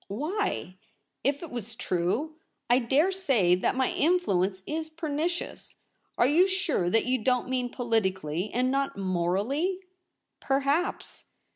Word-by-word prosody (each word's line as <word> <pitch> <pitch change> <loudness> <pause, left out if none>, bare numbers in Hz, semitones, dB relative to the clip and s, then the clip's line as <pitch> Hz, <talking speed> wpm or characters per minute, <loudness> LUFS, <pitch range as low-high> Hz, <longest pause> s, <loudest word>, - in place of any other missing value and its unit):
' - - -40
Why 300 - -2 0.2
— - - -51
if 280 +4 0
it 330 - -8
was 235 -2 -6
true? 225 - -1 0.3
I 245 - +6
dare 275 +9 +2
say 265 - +2
that 180 +6 +1
my 260 -1 +1
influence 200 - +1
is 315 +1 -3
pernicious. 320 +2 -3 0.4
Are - - +5
you 325 +8 +5
sure 375 - 0
that 225 +4 +2
you 255 +1 +1
don't 250 +2 +1
mean 255 -1 -1
politically 190 - -1
and 255 +2 +1
not 275 -3 -1
morally 200 - 0 0.3
?' - - -53
' - - -55
Perhaps.' 280 +7 0
255 Hz, 150 wpm, -28 LUFS, 200-315 Hz, 0.4 s, I